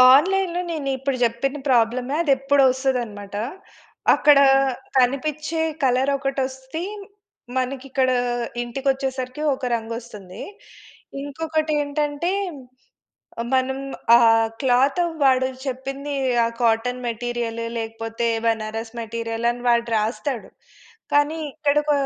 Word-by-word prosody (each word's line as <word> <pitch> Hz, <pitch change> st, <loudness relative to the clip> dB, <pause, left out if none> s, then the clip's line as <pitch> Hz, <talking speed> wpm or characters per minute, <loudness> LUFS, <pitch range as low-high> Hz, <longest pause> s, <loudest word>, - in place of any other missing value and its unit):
ఆన్‌లైన్‌లో 360 Hz, +3 st, +2 dB
నేను 300 Hz, -4 st, -3 dB
ఇప్పుడు 270 Hz, 0 st, -2 dB
చెప్పిన 240 Hz, +5 st, 0 dB
ప్రాబ్లమే 245 Hz, +2 st, +2 dB
అది 300 Hz, -5 st, +2 dB
ఎప్పుడో 275 Hz, +1 st, +3 dB
ఒస్తదన్నమాట. 240 Hz, -6 st, -3 dB, 0.8 s
అక్కడ 295 Hz, -2 st, +6 dB, 0.6 s
కనిపిచ్చే 300 Hz, +5 st, +1 dB, 0.2 s
కలర్ 265 Hz, +2 st, +3 dB
ఒకటి 275 Hz, 0 st, -2 dB
వస్తే, 265 Hz, +4 st, -7 dB, 0.8 s
మనకి 260 Hz, +1 st, -2 dB
ఇక్కడ 260 Hz, -1 st, +2 dB, 0.5 s
ఇంటికి 265 Hz, +3 st, -5 dB
వచ్చేసరికి 265 Hz, 0 st, -4 dB
ఒక 260 Hz, -, -6 dB
రంగు 230 Hz, 0 st, -4 dB
వస్తుంది. 210 Hz, -5 st, -10 dB, 0.8 s
ఇంకొకటి 310 Hz, +2 st, -2 dB
ఏంటంటే, 295 Hz, +4 st, -1 dB, 1.1 s
ఆహ్, 235 Hz, -, -4 dB
మనం 265 Hz, +1 st, 0 dB, 0.4 s
ఆ -, -, +4 dB, 0.4 s
క్లాత్ 270 Hz, +5 st, +3 dB, 0.2 s
వాడు 260 Hz, -1 st, +4 dB, 0.2 s
చెప్పింది 270 Hz, +2 st, -4 dB, 0.3 s
ఆ -, -, +2 dB
కాటన్ 245 Hz, +2 st, +1 dB
మెటీరియలు 235 Hz, 0 st, -3 dB
లేకపోతే, 225 Hz, +1 st, -3 dB, 0.2 s
బనారస్ 225 Hz, +1 st, -2 dB
మెటీరియల్ 230 Hz, +1 st, -3 dB
అని 245 Hz, 0 st, -8 dB
వాడు 235 Hz, 0 st, +3 dB
రాస్తాడు. 230 Hz, +3 st, -2 dB, 0.6 s
కానీ, 290 Hz, +2 st, +3 dB, 0.2 s
ఇక్కడ 295 Hz, -1 st, +1 dB
క -, -, +5 dB
260 Hz, 110 wpm, -23 LUFS, 235-285 Hz, 1.1 s, అక్కడ